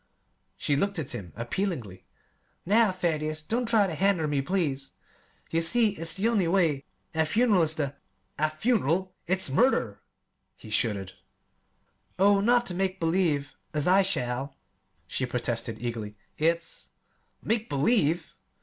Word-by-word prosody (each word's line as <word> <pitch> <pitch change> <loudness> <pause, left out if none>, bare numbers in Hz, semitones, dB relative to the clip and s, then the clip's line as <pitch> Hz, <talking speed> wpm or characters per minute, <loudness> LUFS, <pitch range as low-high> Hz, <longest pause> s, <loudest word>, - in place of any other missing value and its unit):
She 145 - 0
looked 200 +6 0
at 150 -5 -4
him 100 -8 -7
appealingly. 120 - -4 0.6
"Now, 215 +2 +4
Thaddeus, 155 -4 -2
don't 235 +8 -1
try 220 -3 +4
ter 180 - -3
hender 185 -2 +2
me, 145 -2 0
please. 140 -5 -2 0.6
You 165 - +2
see 220 +7 +4
it's 165 -4 -2
the 200 +3 +2
only 210 -7 +2
way. 165 -6 +2 0.3
A 160 0 +2
fun'ral 210 +3 +3
is 160 -1 +1
the 145 -3 -2 0.2
" - - -21
"A 155 0 +2
'fun'ral' 185 - 0
it's 185 -5 0
murder!" 130 - +2 0.5
he 110 - -13
shuddered. 100 -4 -1 1.0
"Oh, 200 +1 +5
not 240 +3 +3
ter 185 - -3
make 190 +1 -1
believe, 165 -4 +1 0.2
as 150 +1 +2
I 190 +2 +6
shall," 135 -7 -2 0.5
she 130 - -2
protested 120 -2 -2
eagerly. 115 -3 -5 0.2
"It's 165 +2 -1 0.3
" - - -41
"Make 225 0 -1
believe!" 160 - +1
165 Hz, 145 wpm, -27 LUFS, 135-195 Hz, 1.0 s, I